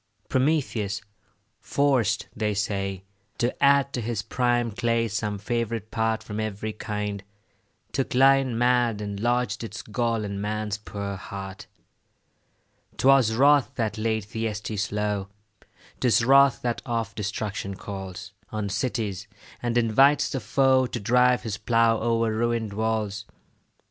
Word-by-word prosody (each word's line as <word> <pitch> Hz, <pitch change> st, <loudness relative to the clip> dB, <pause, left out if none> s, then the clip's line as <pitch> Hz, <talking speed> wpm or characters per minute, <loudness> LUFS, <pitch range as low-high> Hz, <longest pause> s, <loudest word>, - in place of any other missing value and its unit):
Prometheus, 130 Hz, -8 st, 0 dB, 0.6 s
forced, 120 Hz, -7 st, +1 dB
they 105 Hz, -1 st, -1 dB
say, 95 Hz, -2 st, -2 dB, 0.3 s
to 120 Hz, +1 st, 0 dB
add 140 Hz, 0 st, +4 dB
To 125 Hz, -, -2 dB
his 110 Hz, -2 st, -2 dB
prime 120 Hz, -1 st, +1 dB
clay 115 Hz, +1 st, 0 dB
some 105 Hz, -1 st, -2 dB
favourite 115 Hz, 0 st, -3 dB
part 110 Hz, 0 st, 0 dB
From 105 Hz, 0 st, -5 dB
every 110 Hz, 0 st, -3 dB
kind, 105 Hz, -2 st, -4 dB, 0.7 s
took 135 Hz, -2 st, -2 dB
lion 135 Hz, -2 st, +4 dB
mad, 120 Hz, -2 st, +2 dB
And 100 Hz, -1 st, -5 dB
lodged 120 Hz, +2 st, 0 dB
its 110 Hz, -1 st, -6 dB
gall 115 Hz, 0 st, -1 dB
in 100 Hz, -1 st, -4 dB
man's 105 Hz, 0 st, -2 dB
poor 100 Hz, -2 st, -5 dB
heart. 95 Hz, 0 st, -8 dB, 1.3 s
'Twas 130 Hz, -4 st, +5 dB
wrath 140 Hz, 0 st, +4 dB
that 110 Hz, -2 st, -2 dB
laid 110 Hz, -1 st, 0 dB
Thyestes 105 Hz, -2 st, -3 dB
low; 105 Hz, -2 st, -1 dB, 0.7 s
'Tis 120 Hz, -2 st, +3 dB
wrath 135 Hz, 0 st, +5 dB
that 120 Hz, -1 st, -1 dB
oft 115 Hz, -3 st, -3 dB
destruction 105 Hz, -1 st, -3 dB
calls 95 Hz, +1 st, -7 dB, 0.2 s
On 105 Hz, -2 st, -3 dB
cities, 105 Hz, -4 st, -2 dB, 0.3 s
and 120 Hz, 0 st, 0 dB
invites 135 Hz, +5 st, +4 dB
the 135 Hz, -, -1 dB
foe 130 Hz, -1 st, +3 dB
To 120 Hz, -, -4 dB
drive 125 Hz, +4 st, +3 dB
his 105 Hz, -3 st, -3 dB
plough 115 Hz, 0 st, +3 dB
o'er 115 Hz, -1 st, +1 dB
ruin'd 115 Hz, -2 st, -1 dB
walls. 105 Hz, -1 st, -1 dB
110 Hz, 130 wpm, -25 LUFS, 105-120 Hz, 1.3 s, Twas